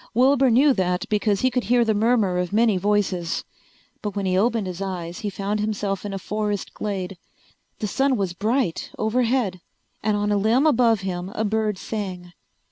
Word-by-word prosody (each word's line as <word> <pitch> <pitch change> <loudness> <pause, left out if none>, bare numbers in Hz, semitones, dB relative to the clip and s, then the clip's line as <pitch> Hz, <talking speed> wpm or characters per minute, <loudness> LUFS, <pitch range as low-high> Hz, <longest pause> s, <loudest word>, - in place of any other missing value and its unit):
Wilbur 265 +2 +4
knew 270 +5 +5
that 180 -3 -1
because 210 -1 +1
he 255 - +2
could 250 -1 -1
hear 240 0 +3
the 220 - +2
murmur 210 -4 +2
of 180 -1 -2
many 220 0 +3
voices. 185 -3 0 0.6
But 210 -2 -4
when 200 -1 -2
he 185 -1 +1
opened 225 +2 +2
his 185 0 -5
eyes 180 -3 -4
he 210 -4 -3
found 200 +2 -2
himself 205 -2 -2
in 205 - -4
a 195 - -3
forest 210 0 -3
glade. 195 -3 -4 0.6
The 215 - -3
sun 270 +4 +1
was 190 -4 -1
bright 215 -1 -1
overhead 225 -4 0 0.4
and 210 0 +1
on 205 0 0
a 205 - +3
limb 225 +8 +3
above 235 -7 +4
him 180 -1 -4
a 220 - 0
bird 215 -1 0
sang. 185 -4 -5
210 Hz, 185 wpm, -23 LUFS, 190-230 Hz, 0.6 s, knew